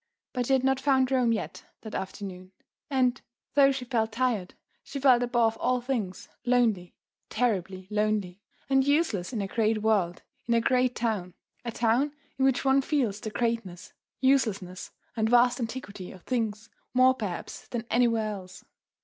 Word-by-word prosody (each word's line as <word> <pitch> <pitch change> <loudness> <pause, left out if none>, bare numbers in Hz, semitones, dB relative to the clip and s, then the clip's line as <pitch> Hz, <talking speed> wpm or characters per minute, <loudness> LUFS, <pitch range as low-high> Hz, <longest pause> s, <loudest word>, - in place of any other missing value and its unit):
But 245 -2 -1
she 270 - +3
had 260 -1 +3
not 265 0 +2
found 265 -2 +2
Rome 250 -3 +3
yet 225 - -3 0.2
that 220 - -9
afternoon. 190 -1 -6 0.4
And, 260 -2 +1 0.3
though 275 -1 +6
she 265 -2 -4
felt 225 -3 0
tired, 230 -6 -1 0.3
she 280 - -6
felt 255 -3 +5
above 240 -2 +2
all 255 0 +1
things 240 -7 -3 0.2
lonely, 230 -8 +1 0.3
terribly 190 -6 -1
lonely 210 -3 0 0.3
and 270 -1 +4
useless 285 - +1
in 220 -5 -2
a - - -3
great 215 0 0
world, 195 -6 +1 0.2
in 235 - +3
a - - +5
great 250 +1 +2
town, 210 -6 -2 0.3
a 235 - -3
town 240 +6 +1 0.3
in 265 - +4
which 270 0 +2
one 270 +1 +5
feels 255 -8 0
the 215 - -5
greatness, 210 -5 -3 0.3
uselessness 215 -9 +1 0.3
and 220 -1 +1
vast 245 +1 +4
antiquity 225 -6 -5
of 185 - -14
things 225 -3 -2 0.2
more 255 +1 +6
perhaps 205 -9 -6
than 235 -1 -4
anywhere 230 -2 +3
else. 185 -2 -9
230 Hz, 160 wpm, -28 LUFS, 205-255 Hz, 0.4 s, though